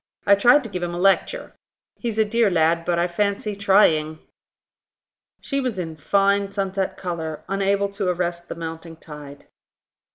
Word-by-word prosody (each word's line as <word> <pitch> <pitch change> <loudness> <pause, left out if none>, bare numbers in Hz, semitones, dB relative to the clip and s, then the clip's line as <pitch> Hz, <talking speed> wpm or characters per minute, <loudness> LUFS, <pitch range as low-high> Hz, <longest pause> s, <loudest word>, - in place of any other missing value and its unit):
I 200 - +6
tried 245 +8 +5
to 230 - -7
give 180 - -4
him 175 0 -3
a - - -4
lecture. 195 - +1 0.5
He's 230 -3 -3
a 220 - +3
dear 230 0 +2
lad, 165 -1 +2
but, 175 -1 0
I 170 +1 +2
fancy, 200 +3 -2
trying." 180 -6 +3 1.2
She 275 -1 -2
was 250 -6 -3
in 165 -3 -4
fine 200 +5 +1
sunset 195 -1 -2
colour, 160 -4 -5
unable 195 +1 +1
to 200 -2 -2
arrest 175 -1 -3
the - - -5
mounting 165 0 -7
tide. 150 -3 -11
190 Hz, 160 wpm, -22 LUFS, 165-200 Hz, 1.2 s, I